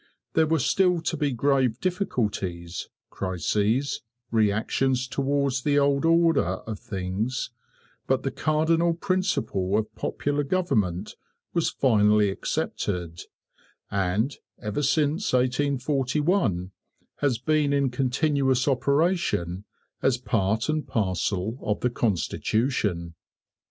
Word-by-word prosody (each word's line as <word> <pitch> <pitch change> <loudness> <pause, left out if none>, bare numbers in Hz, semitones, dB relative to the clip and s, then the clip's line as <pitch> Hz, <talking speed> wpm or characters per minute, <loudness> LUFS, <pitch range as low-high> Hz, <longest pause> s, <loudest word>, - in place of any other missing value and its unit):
There 160 -1 +3
were 160 +1 +2
still 180 +5 +2
to 165 - -1
be 145 -2 0
grave 130 -1 +1
difficulties, 105 - -2 0.2
crises, 105 - 0 0.3
reactions 115 +4 +1
towards 140 -1 0
the 145 +2 +2
old 140 +1 +3
order 165 0 +4 0.2
of 110 -3 -5
things; 100 +8 -3 0.6
but - - +1
the - - -1
cardinal 165 +2 +2
principle 165 - 0
of 110 0 -2
popular 145 0 -1
government 110 - 0 0.4
was 170 - +1
finally 105 -5 +3
accepted, 85 -3 -3 0.7
and, 100 +7 0 0.2
ever 105 +4 -2
since 150 +5 +1
1841, 130 - +1 0.5
has 140 -5 +1
been 150 +3 +1
in 140 -2 +2
continuous 135 0 +1
operation, 140 - +1 0.4
as 130 -2 +2
part 110 -2 0
and 155 -1 -1
parcel 100 +1 -1
of 105 0 -2
the 125 - +1
constitution. 105 -4 0
130 Hz, 105 wpm, -26 LUFS, 105-145 Hz, 0.7 s, order